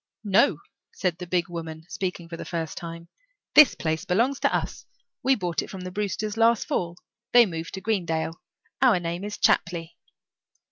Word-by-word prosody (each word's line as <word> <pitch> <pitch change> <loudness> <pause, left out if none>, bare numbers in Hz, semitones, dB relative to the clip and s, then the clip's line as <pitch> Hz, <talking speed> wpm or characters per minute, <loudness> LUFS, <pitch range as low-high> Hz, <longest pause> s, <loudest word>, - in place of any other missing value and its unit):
"No," 210 +6 +4 0.3
said 180 - -2
the 180 - -6
big 175 0 +1
woman, 160 -2 -7
speaking 180 -3 -4
for 165 - -7
the - - -6
first 165 -2 -4
time, 170 0 -7 0.5
"this 300 -3 +8
place 160 -1 -2
belongs 240 +9 +1
to - - +2
us. - - -3 0.3
We 265 0 +4
bought 175 -6 -1
it - - -8
from 190 - -7
the 185 0 -6
Brewsters 210 +2 -2
last 230 0 +4
fall. 170 0 -2 0.4
They 240 -1 +9
moved 165 -3 -5
to 190 - -6
Greenvale. 170 -7 -1 0.5
Our 245 -8 +5
name 170 +2 -4
is 205 0 -5
Chapley." 170 -1 +1
180 Hz, 175 wpm, -26 LUFS, 170-210 Hz, 0.5 s, They